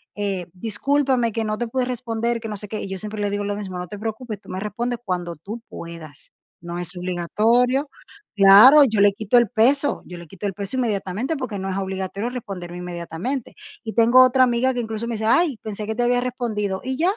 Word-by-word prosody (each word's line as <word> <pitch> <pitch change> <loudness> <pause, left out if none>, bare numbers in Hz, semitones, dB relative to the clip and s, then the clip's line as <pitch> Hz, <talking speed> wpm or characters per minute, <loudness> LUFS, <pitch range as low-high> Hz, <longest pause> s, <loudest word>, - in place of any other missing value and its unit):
eh, 195 -4 -3
discúlpame, 240 +4 0
que 225 - -1
no 215 0 -2
te 240 - -2
pude 255 +3 -1
responder", 235 -1 -2
que 225 - -7
no 210 - -4
sé 210 +1 -5
qué, 215 - -4
y - - -5
yo 190 - -4
siempre 210 +2 -6
le 205 - 0
digo 205 0 -2
lo 205 0 -2
mismo: 190 -3 -6
"No 180 - -5
te 205 +4 -8
preocupes, 220 -1 -5
tú - - -21
me 185 - -4
respondes 235 +4 -3
cuando 175 -4 -3
tú 210 +9 -8
puedas". 165 -3 -10 0.3
No 170 0 -5
es 175 +1 -4
obligatorio. 225 - +1 0.5
Claro, 210 +9 +9
yo 220 -5 +1
le 200 0 +5
quito 215 +3 +2
el 235 -4 +1
peso, 275 +8 +2
yo 180 - -9
le 170 - -11
quito 195 +5 -8
el 195 - -1
peso 200 +5 -4
inmediatamente 220 - -1
porque 255 -7 -4
no 190 - -4
es - - -3
obligatorio 190 +3 -3
responderme 195 -8 -7
inmediatamente. 180 - -5 0.3
Y 220 - -5
tengo 235 +3 +6
otra 255 0 +4
amiga 250 +1 +2
que 245 - -3
incluso 225 0 -4
me 235 - -2
dice: 220 0 -3
"Ay, 305 +2 +3
pensé 210 -1 -5
que 220 - -2
te 245 - 0
había 245 0 +2
respondido", 220 -6 -2
y 260 0 -3
ya. 345 +4 +2
215 Hz, 225 wpm, -22 LUFS, 190-245 Hz, 0.5 s, Claro